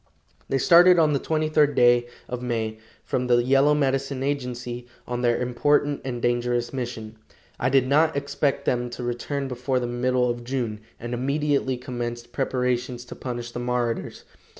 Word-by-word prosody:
They 135 - +1
started 175 +6 +7
on 155 -3 +4
the 140 - +1
twenty 155 +1 0
third 150 -1 +3
day 120 0 +4 0.2
of 125 0 -5
May, 110 -3 -2 0.2
from 125 0 -1
the 120 -1 +4
Yellow 135 +3 +4
Medicine 135 -1 0
agency, 125 -3 -3 0.2
on 120 0 -3
their 120 -1 +2
important 145 +4 +1
and 125 -2 -4
dangerous 120 0 0
mission. 115 -4 -5 0.4
I 125 - +1
did 135 -1 +4
not 155 +3 +3
expect 140 0 -1
them 120 0 0
to 120 +1 -7
return 135 +3 -3
before 130 +1 -1
the 125 - -2
middle 125 +1 +1
of 120 0 -3
June, 120 -4 -3 0.2
and 120 +1 -5
immediately 140 +1 0
commenced 120 -2 -5
preparations 125 -2 -1
to - - -9
punish 120 -2 -5
the 120 - -5
marauders. 120 -1 -2
125 Hz, 165 wpm, -24 LUFS, 120-135 Hz, 0.4 s, started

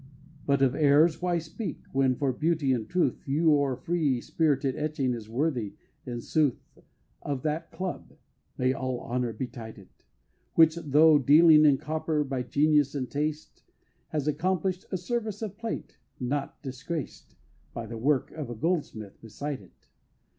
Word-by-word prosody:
But 140 -1 +3
of 130 -2 +3
errors 155 +3 +4
why 175 -1 +1
speak, 170 +6 -6
when 135 -1 +2
for 135 0 0
beauty 155 -1 +1
and 115 -4 -3
truth 180 -1 +1
Your 145 -2 +3
free, 150 -5 0
spirited 140 -1 0
Etching 145 -4 -1
is 110 -2 -7
worthy, 120 -5 -1 0.3
in 120 -1 -4
sooth, 150 -3 +1 0.6
Of 140 -3 -4
that 155 +2 -2
Club 185 -1 -6 0.4
(may 130 +1 +2
all 130 -2 -3
honor 125 -1 -2
betide 115 -1 -7
it!) 95 -2 -18 0.5
Which, 160 -1 +6
tho' 155 -1 +5
dealing 155 +3 +7
in 145 -2 +5
copper, 155 +1 -1
by 135 -2 -3
genius 145 +2 +2
and 130 -3 -3
taste, 150 +1 -3 0.5
Has 150 -2 -3
accomplish'd 185 +4 -1
a 185 - 0
service 215 +2 -3
of 205 -3 -5
plate 230 +1 -6 0.2
not 135 +2 -3
disgraced 140 +3 -6 0.4
By 115 - -6
the 115 +1 -7
work 135 +2 +1
of 150 -6 -6
a 120 - -5
Goldsmith 115 - -3
beside 135 +4 -5
it. 95 - -22
145 Hz, 150 wpm, -28 LUFS, 130-160 Hz, 0.6 s, dealing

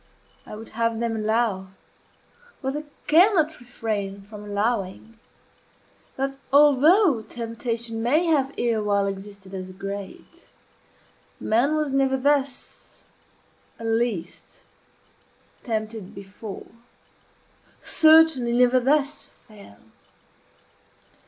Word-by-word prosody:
I - - -8
would 225 +1 -10
have 230 0 -1
them 230 -1 -1
allow 215 -3 -1 0.9
what 265 0 -2
they 300 +1 -5 0.2
cannot 320 -1 +4
refrain 210 -5 -4
from 210 +1 -11
allowing 210 +1 -3 1.0
that, 270 0 -3
although 295 - +5
temptation 230 0 -4
may 295 +9 +2
have 280 -5 +2
erewhile 210 -4 +1
existed 195 0 -7
as 185 -1 -6
great, 195 +1 -8 0.9
man 245 +8 +1
was 305 -2 -1
never 270 0 +2
thus, 275 -1 -2 0.7
at 230 - -8
least, 225 -6 -3 1.0
tempted 220 -4 -4
before 195 +1 -9 1.1
certainly, 315 -6 +5
never 250 +1 +4
thus 280 +3 +1 0.2
fell. 200 - -15
230 Hz, 90 wpm, -24 LUFS, 205-275 Hz, 1.1 s, although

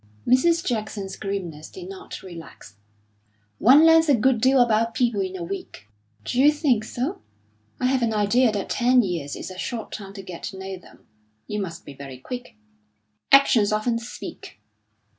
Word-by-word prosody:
Mrs. 330 +7 +3
Jackson's 215 - -3
grimness 180 -6 -5
did 370 -1 -10
not 390 +1 -9
relax. 165 - -11 0.8
"One 280 +7 +7
learns 325 -1 +6
a 280 - +6
good 240 0 +2
deal 260 +2 +4
about 230 -1 +2
people 235 -5 +1
in 190 0 -3
a 175 - -5
week." 170 - -7 0.4
"D'you 270 +4 +4
think 285 -8 +1
so? 245 +4 -4 0.6
I - - -1
have 260 0 +2
an 230 -1 +1
idea 220 +3 +3
that 205 -2 -3
ten 250 0 +3
years 165 -7 -3
is - - -7
a 185 - -9
short 230 +2 -4
time 195 -2 -8
to 195 - -8
get 180 -2 -9
to 195 - -6
know 190 0 -6
them. 185 - -17 0.4
You 210 0 -3
must 170 -2 -7
be 145 - -9
very 135 -1 -9
quick." 245 - -8 0.8
"Actions 245 -7 +5
often 230 +2 0
speak." 235 +1 -9
220 Hz, 170 wpm, -24 LUFS, 190-255 Hz, 0.8 s, One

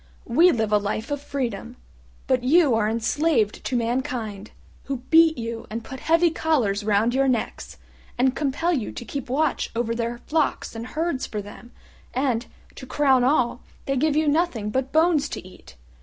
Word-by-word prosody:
We 330 +10 +5
live 220 -5 -1
a 210 - +4
life 210 +4 -3
of 285 -1 -2
freedom; 240 -5 -4 0.5
but 255 -2 +1
you 295 0 +4
are 220 -1 +2
enslaved 230 0 0
to 255 - -2
mankind, 230 -3 -2 0.4
who 265 -3 -4
beat 325 -1 +6
you, 230 -1 -5
and 225 +1 -5
put 265 +2 -8
heavy 330 +3 +3
collars 245 -12 0
round 215 +3 +2
your 270 +1 +2
necks, 245 -4 -2 0.4
and 260 +1 +2
compel 310 +4 0
you 255 -9 -2
to 240 - -8
keep 270 +2 -6
watch 285 +2 0
over 230 0 0
their 235 0 -3
flocks 300 +4 -1
and 230 +1 -6
herds 310 -1 -2
for 215 - -4
them, 205 +4 -11 0.4
and, 250 -3 0 0.3
to 260 - -9
crown 265 -2 +3
all, 250 -3 +2 0.2
they 275 - 0
give 290 +3 +1
you 310 0 +2
nothing 290 -9 0
but 260 +3 -1
bones 315 -2 +3
to - - -7
eat. 185 - -16
255 Hz, 175 wpm, -24 LUFS, 230-295 Hz, 0.5 s, beat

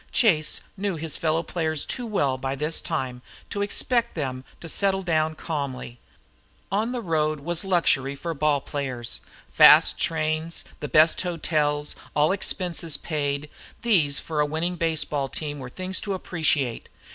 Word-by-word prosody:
Chase 165 -10 +2 0.2
knew 195 -1 -1
his 160 -1 -3
fellow 160 +1 +1
players 160 -4 -1
too 245 -2 -3
well 145 -11 +1
by 135 +1 -3
this 150 +3 -1
time 130 -6 -3 0.3
to 200 - -2
expect 235 +3 0
them 130 -5 -3 0.2
to 170 - -8
settle 195 +3 +1
down 160 -2 +1
calmly. 140 -7 -4 0.7
"On 215 +4 +1
the 245 -2 -3
road" 155 -3 0
was 170 +4 -1
luxury 145 -7 +2
for 165 +4 -4
ball 150 -2 +2
players. 130 -5 -3 0.3
Fast - - +8
trains, 155 +1 -1
the 150 - -5
best 155 +1 +5
hotels, 150 -4 0 0.2
all 150 +3 +4
expenses 175 -5 -1
paid, 145 -1 -2 0.4
these 160 -12 +3
for 155 -2 -3
a 150 - +4
winning 165 +4 -1
baseball 155 -4 -1
team 145 0 -4
were 130 -2 -7
things 185 +6 -2
to 200 -2 -2
appreciate. 155 -9 0
155 Hz, 150 wpm, -25 LUFS, 145-175 Hz, 0.7 s, Fast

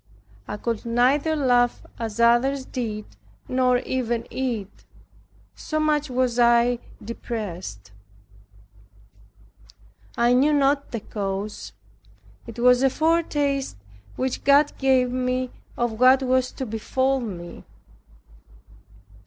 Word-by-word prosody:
I - - -5
could 230 0 -3
neither 260 +7 +2
laugh 245 -4 +2
as 225 -1 -5
others 250 +4 +3
did, 215 -5 -4 0.4
nor 255 -1 +2
even 240 -2 -2
eat; 235 -7 -4 0.7
so 310 - -4
much 300 -1 +1
was 250 -1 0
I 240 0 +4 0.3
depressed. 185 - -6 2.3
I 240 +1 +3
knew 280 +4 +4
not 280 0 +2
the 230 - -5
cause. 200 0 -5 0.7
It - - -9
was 250 +1 +4
a 270 - +4
foretaste 295 - 0 0.4
which 260 -1 -3
God 285 +2 +4
gave 260 -2 +3
me 255 0 -1 0.3
of 235 -2 -2
what 260 +1 +6
was 255 0 +1
to 265 - -5
befall 260 +4 0
me. 180 -8 -7
250 Hz, 105 wpm, -24 LUFS, 230-270 Hz, 2.3 s, what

